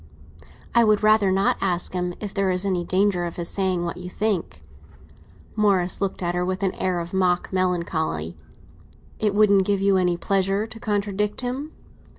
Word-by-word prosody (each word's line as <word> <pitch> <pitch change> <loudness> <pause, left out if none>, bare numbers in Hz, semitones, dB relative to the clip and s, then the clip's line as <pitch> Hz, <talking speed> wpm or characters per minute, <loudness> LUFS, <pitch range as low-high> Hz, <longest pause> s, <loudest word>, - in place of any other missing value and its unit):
"I 235 - +5
would 215 -1 +3
rather 215 -2 +4
not 195 +1 +2
ask 180 -2 -1
him, 180 -1 -2
if 205 -2 -6
there 195 -1 +1
is 185 +1 0
any 185 -3 0
danger 185 0 +1
of 170 - -5
his 170 -1 -3
saying 185 -3 0
what 170 - -4
you 180 0 -7
think." 180 - -2 0.9
Morris 195 -4 +2
looked 195 -1 -2
at 175 0 0
her 180 0 0
with 185 +2 -2
an 190 - +1
air 185 -2 -1
of 170 +1 -6
mock 180 -1 +1
melancholy. 170 - -1 0.8
"It 210 -2 0
wouldn't 200 -2 +5
give 200 +1 0
you 195 0 +3
any 180 -2 +1
pleasure 195 +3 0
to 225 0 -10
contradict 210 -1 -1
him?" 260 +5 -4
190 Hz, 175 wpm, -23 LUFS, 180-205 Hz, 0.9 s, I